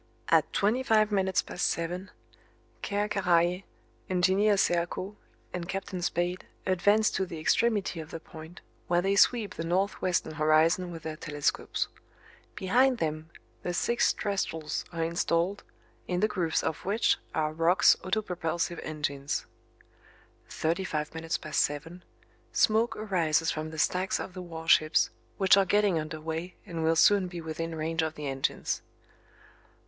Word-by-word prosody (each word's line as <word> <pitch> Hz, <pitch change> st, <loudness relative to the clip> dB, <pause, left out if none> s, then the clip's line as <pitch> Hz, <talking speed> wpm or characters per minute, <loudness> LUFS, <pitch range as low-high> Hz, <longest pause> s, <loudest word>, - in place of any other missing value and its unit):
At -, -, +4 dB
twenty 215 Hz, +6 st, +1 dB
five 220 Hz, -5 st, +3 dB
minutes 190 Hz, -2 st, +1 dB
past 175 Hz, -, -1 dB
seven: 175 Hz, +3 st, -3 dB, 0.7 s
Ker 205 Hz, 0 st, -1 dB
Karraje, 180 Hz, -2 st, +2 dB, 0.4 s
Engineer 190 Hz, +3 st, +3 dB
Serko 175 Hz, +3 st, 0 dB, 0.4 s
and 175 Hz, 0 st, -5 dB
Captain 190 Hz, -1 st, -4 dB
Spade 175 Hz, +1 st, -1 dB, 0.2 s
advance 205 Hz, +4 st, +3 dB
to 190 Hz, -, 0 dB
the 175 Hz, -3 st, -6 dB
extremity 205 Hz, +1 st, +1 dB
of 155 Hz, -1 st, -7 dB
the 165 Hz, -, -6 dB
point, 160 Hz, +1 st, -12 dB, 0.3 s
where 175 Hz, 0 st, +2 dB
they 195 Hz, +1 st, +2 dB
sweep 220 Hz, +1 st, +3 dB
the 165 Hz, -, -5 dB
north 185 Hz, +4 st, 0 dB
western 180 Hz, -3 st, 0 dB
horizon 155 Hz, +4 st, +3 dB
with 165 Hz, -2 st, -8 dB
their 155 Hz, -1 st, -5 dB
telescopes. 145 Hz, -3 st, -1 dB, 0.7 s
Behind 250 Hz, +7 st, +3 dB
them 155 Hz, -2 st, -3 dB, 0.3 s
the 175 Hz, -, -3 dB
six 235 Hz, +5 st, +2 dB
trestles 165 Hz, -6 st, -2 dB
are 165 Hz, -1 st, -2 dB
installed, 170 Hz, +3 st, 0 dB, 0.4 s
in 180 Hz, -1 st, -1 dB
the 215 Hz, -, +3 dB
grooves 175 Hz, -6 st, 0 dB
of 160 Hz, -, -3 dB
which 210 Hz, +4 st, +2 dB, 0.2 s
are 155 Hz, -1 st, 0 dB
Roch's 165 Hz, +4 st, +5 dB
autopropulsive 180 Hz, -4 st, -2 dB
engines. 145 Hz, -2 st, -3 dB, 1.0 s
Thirty 165 Hz, +4 st, -1 dB
five 150 Hz, -4 st, -3 dB
minutes 160 Hz, +1 st, -2 dB
past 155 Hz, -, -2 dB
seven: 165 Hz, +5 st, -2 dB, 0.5 s
Smoke 225 Hz, +1 st, +2 dB
arises 165 Hz, -6 st, +1 dB
from 155 Hz, 0 st, -4 dB
the 160 Hz, -, -9 dB
stacks 180 Hz, +4 st, +1 dB
of 185 Hz, -, -6 dB
the 185 Hz, -, -7 dB
warships, 165 Hz, -2 st, +2 dB, 0.3 s
which 190 Hz, -1 st, +6 dB
are 200 Hz, -, +5 dB
getting 200 Hz, -2 st, +2 dB
under 155 Hz, +1 st, -5 dB
way 165 Hz, +3 st, -5 dB
and 165 Hz, -2 st, -4 dB
will 165 Hz, +1 st, +3 dB
soon 195 Hz, +3 st, +5 dB
be 175 Hz, -1 st, -7 dB
within 165 Hz, 0 st, -4 dB
range 165 Hz, +1 st, -1 dB
of 160 Hz, 0 st, -2 dB
the 150 Hz, -, -6 dB
engines. 135 Hz, -1 st, -2 dB
175 Hz, 145 wpm, -29 LUFS, 160-195 Hz, 1.0 s, which